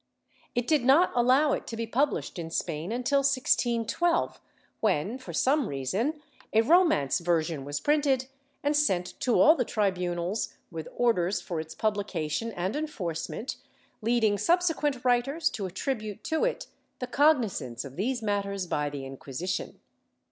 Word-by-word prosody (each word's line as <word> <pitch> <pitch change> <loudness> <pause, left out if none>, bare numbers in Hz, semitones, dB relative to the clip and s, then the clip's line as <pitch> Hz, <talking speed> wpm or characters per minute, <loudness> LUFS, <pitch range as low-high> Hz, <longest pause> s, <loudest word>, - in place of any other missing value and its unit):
It 245 0 +1
did 300 -2 +2
not 280 +8 +5
allow 260 +5 +4
it - - -3
to 230 - -5
be 230 - -2
published 260 -4 -1
in 165 -1 -5
Spain 165 +2 -3
until 250 +4 +1
1612 275 +3 +1 0.4
when, 205 - 0
for 260 - -8
some 275 -1 +2
reason, 205 - -2 0.3
a 220 - +5
Romance 310 - +3
version 165 -4 0
w^as 145 0 -4
printed 285 -3 +2 0.4
and 290 +1 +2
sent 190 -12 +1
to 245 - +2
all 310 - +8
the 255 - +1
tribunals 180 -2 -1 0.2
with 160 -2 -6
orders 205 -6 +2
for 170 -3 -4
its 160 0 -7
publication 205 -1 -1
and 185 +4 -2
enforcement, 225 - -4 0.4
leading 220 -2 +2
subsequent 325 -7 +1
writers 275 +6 +2
to 200 -4 -4
attribute 215 +2 -4
to 320 +7 0
it - - -2 0.3
the 250 - -3
cognizance 230 - +1
of 135 -1 -10
these 235 - -1
mat 205 -1 +1
ters 200 -1 -4
by 150 -4 -1
the 145 -1 -6
Inc^uisition. 135 +7 -5
225 Hz, 150 wpm, -28 LUFS, 175-275 Hz, 0.4 s, all